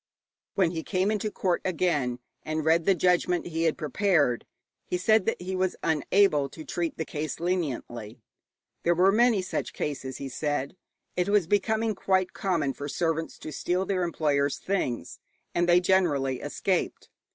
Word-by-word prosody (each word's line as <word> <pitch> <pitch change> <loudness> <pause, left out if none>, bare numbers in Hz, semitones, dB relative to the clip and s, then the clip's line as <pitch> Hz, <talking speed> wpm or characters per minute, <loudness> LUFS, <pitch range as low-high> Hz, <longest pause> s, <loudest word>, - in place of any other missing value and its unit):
When 185 -4 +3
he 165 -2 -3
came 190 +4 0
into 215 0 -1
court 185 -4 0
again 155 -9 0 0.2
and 155 0 -3
read 165 +1 +3
the 195 - +4
judgment 180 0 +2
he 165 -1 -1
had 160 - +1
prepared, 150 - +1 0.4
he 180 - -1
said 215 +2 +3
that 225 - 0
he 185 +1 -4
was 185 0 0
unable 160 -1 +3
to 155 +3 -10
treat 170 -2 -3
the 160 - -2
case 150 +1 -4
leniently. 125 - -3 0.6
There 170 +1 +2
were 185 +3 +5
many 225 -2 +3
such - - -3
cases, 130 -3 -4
he 140 - -5
said. 145 +1 -2 0.4
It 180 +1 0
was 205 -3 +4
becoming 220 +4 +1
quite 190 -1 +1
common 165 -8 0
for 145 - -6
servants 165 +1 -1
to 155 - -8
steal 180 +5 -1
their 190 -2 0
employers' 145 -5 +1
things, 185 -11 -2 0.3
and 175 0 +1
they 175 +1 +7
generally 155 -9 +1
escaped. - - -2
175 Hz, 165 wpm, -27 LUFS, 150-190 Hz, 0.6 s, they